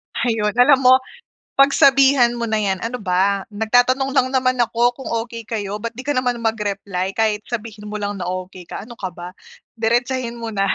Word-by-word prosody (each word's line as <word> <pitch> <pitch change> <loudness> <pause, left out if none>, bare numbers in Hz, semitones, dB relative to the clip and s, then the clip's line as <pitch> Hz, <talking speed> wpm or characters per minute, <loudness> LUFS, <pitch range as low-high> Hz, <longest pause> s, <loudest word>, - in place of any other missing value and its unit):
Ayun. 225 -3 0
Alam 260 +2 +5
mo, 255 - +9 0.7
pagsabihan 275 -2 +5
mo 235 - -1
na 220 -1 0
yan, 195 -3 -1
"Ano 235 +2 -3
ba? 195 +1 +1
Nagtatanong 245 +5 +2
lang 260 -1 +3
naman 255 -1 +2
ako 240 +1 +2
kung 265 - -8 0.2
okey 230 -1 -9
kayo, 205 -3 -4
ba't 230 +1 -4
di 255 +3 -8
ka 290 - -1
naman 250 -1 0
mag-reply? 200 -4 -2
Kahit 215 -1 0
sabihin 220 -3 -6
mo 210 0 -5
lang 205 0 -3
na 180 - -5
okey 185 0 -6
ka - - -7
ano 240 - -11
ka 190 - -4
ba?" 175 +1 -9 0.4
Diretsahin 240 +1 -1
mo 230 -1 -4
na. 195 -1 0
225 Hz, 190 wpm, -20 LUFS, 205-245 Hz, 0.7 s, mo